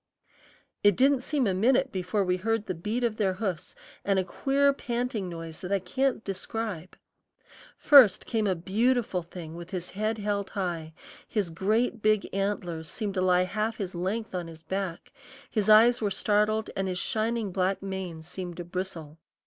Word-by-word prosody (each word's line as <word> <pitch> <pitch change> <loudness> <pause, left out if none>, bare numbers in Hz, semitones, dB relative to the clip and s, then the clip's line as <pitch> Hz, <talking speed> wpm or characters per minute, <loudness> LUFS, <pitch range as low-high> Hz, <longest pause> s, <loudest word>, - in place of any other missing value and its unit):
It 205 -2 +6
didn't 270 +2 +4
seem 280 -1 0
a 195 - +1
minute 250 +7 +3
before 190 +2 -1
we 180 -1 +1
heard 225 +2 -1
the 185 - -2
beat 210 +9 -3
of 225 -2 0
their 195 -3 +1
hoofs 185 - -4 0.3
and 195 -1 +1
a 190 - +2
queer 280 +8 +2
panting 240 -6 -3
noise 165 -1 -7
that 180 - -6
I 200 - +4
can't 225 +7 -1
describe. 195 -2 -4 0.8
First 260 -10 +7
came 220 -2 0
a 190 - +2
beautiful 215 +3 +1
thing 165 -1 -9
with 170 +1 -8
his 180 -2 -4
head 215 +3 -1
held 205 -2 -2
high; 170 -5 -3 0.3
his 200 -6 -1
great 215 +6 0 0.3
antlers 180 -5 -2
seemed 210 -4 -4
to 185 - 0
lie 180 -1 +4
half 215 +4 -2
his 190 -3 -4
length 195 +6 -3
on 175 -2 -3
his 160 -1 -12
back; 190 0 -4 0.4
his 215 -2 0
eyes 230 +3 +7
were 210 - +1
startled, 210 +2 +1
and 195 0 -1
his 180 -1 -2
shining 220 +1 -1
black 190 +1 0
mane 190 -4 -5
seemed 175 +1 -7
to 175 - -4
bristle. 170 -4 -5
195 Hz, 175 wpm, -28 LUFS, 180-220 Hz, 0.8 s, First